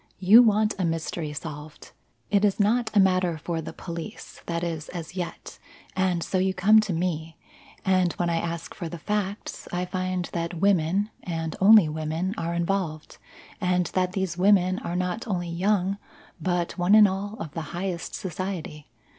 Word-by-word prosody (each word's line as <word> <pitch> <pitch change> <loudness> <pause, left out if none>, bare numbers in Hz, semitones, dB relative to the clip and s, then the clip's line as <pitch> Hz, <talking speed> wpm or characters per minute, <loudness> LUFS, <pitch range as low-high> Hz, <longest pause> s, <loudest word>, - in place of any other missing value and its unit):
You 200 +6 +8
want 215 -2 +3
a - - +1
mystery 165 -1 -2
solved. 150 0 -8 0.4
It 205 -1 +3
is 205 0 +2
not 220 +3 +2
a - - +6
matter 185 -3 +3
for 165 +1 -3
the 160 - -7
police 170 +4 -8
that 170 0 -2
is, 160 -3 -4
as 170 -1 -7
yet, 175 -2 -6 0.4
and 185 -3 +1
so 185 - -1
you 190 0 +1
come 215 +4 +6
to 215 -2 -1
me, 165 -2 -2 0.5
and 185 -2 +3
when 175 - -1
I 170 -1 +1
ask 165 0 -4
for 170 -4 -6
the 170 - -6
facts, 205 +3 -3
I 180 +1 -1
find 185 -1 -2
that 170 0 -2
women 195 +2 +2
and 165 -2 -4
only 205 -3 +8
women 160 +4 -2
are 170 +1 -3
involved, 170 -3 -2 0.4
and 180 -1 +2
that 185 -1 0
these 190 -3 -2
women 185 -1 +4
are 175 - -4
not 180 +6 -2
only 175 -4 -2
young 195 +2 0 0.4
but 175 +1 -1
one 180 +4 +5
and 215 -1 +8
all 200 +2 -4
of 160 - -6
the 165 - -4 0.2
highest 180 -2 -3
society. 175 -4 -5
180 Hz, 170 wpm, -26 LUFS, 170-195 Hz, 0.5 s, You